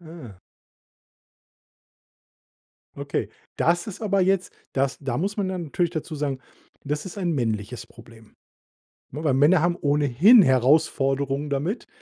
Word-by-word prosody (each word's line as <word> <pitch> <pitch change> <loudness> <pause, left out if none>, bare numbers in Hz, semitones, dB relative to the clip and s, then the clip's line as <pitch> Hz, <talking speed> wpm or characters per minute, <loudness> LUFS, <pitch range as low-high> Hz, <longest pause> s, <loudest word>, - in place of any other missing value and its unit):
Ah. 155 - -12 2.6
Okay, - - -3 0.3
das 175 +3 +1
ist 205 +1 -8
aber 200 -2 +1
jetzt 190 0 +1 0.2
das 135 0 -1
da 135 -2 -3
muss 200 +6 -2
man 200 -2 -1
dann 185 -2 -4
natürlich 170 +3 -1
dazu 160 -1 -5
sagen: 140 -3 -2 0.5
„Das 150 +4 -3
ist 185 - -8
ein 180 -3 -1
männliches 115 -2 -3
Problem“, 115 -2 -17 0.8
ne, 150 +4 -6
weil 145 -4 +2
Männer 150 +6 +4
haben 175 0 +1
ohnehin 150 - +5
Herausforderungen 135 0 +1
damit, 145 - -3
150 Hz, 130 wpm, -24 LUFS, 135-175 Hz, 2.6 s, ohnehin